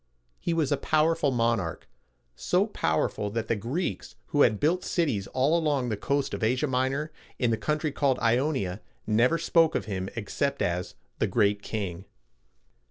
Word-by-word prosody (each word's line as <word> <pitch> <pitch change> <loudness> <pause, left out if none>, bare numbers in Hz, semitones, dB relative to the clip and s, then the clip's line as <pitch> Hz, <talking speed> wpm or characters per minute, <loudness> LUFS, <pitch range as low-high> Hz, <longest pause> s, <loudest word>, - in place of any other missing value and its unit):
He - - -2
was 160 -4 +1
a 145 - +3
powerful 155 +1 +2
monarch, 115 - 0 0.5
so 180 - +1
powerful 105 - -1
that 110 +1 -3
the 115 - +2
Greeks, 125 - -3
who 145 - +2
had 110 -6 +4
built 175 +4 +1
cities 130 - 0
all 135 +5 +2
along 145 -7 +1
the 110 - 0
coast 140 +7 -1
of - - -4
Asia 125 +6 +1
Minor, 135 +3 -1 0.3
in 120 -3 +1
the - - +3
country 150 +5 -1
called 135 -2 +1
Ionia, 115 -5 0 0.2
never 120 +9 +3
spoke 165 0 +3
of - - -1
him 95 -2 -3
except 120 +5 -1
as 90 +1 -2 0.2
"The - - +2
Great 100 0 +2
King." 95 -4 -4
130 Hz, 165 wpm, -27 LUFS, 105-150 Hz, 0.5 s, had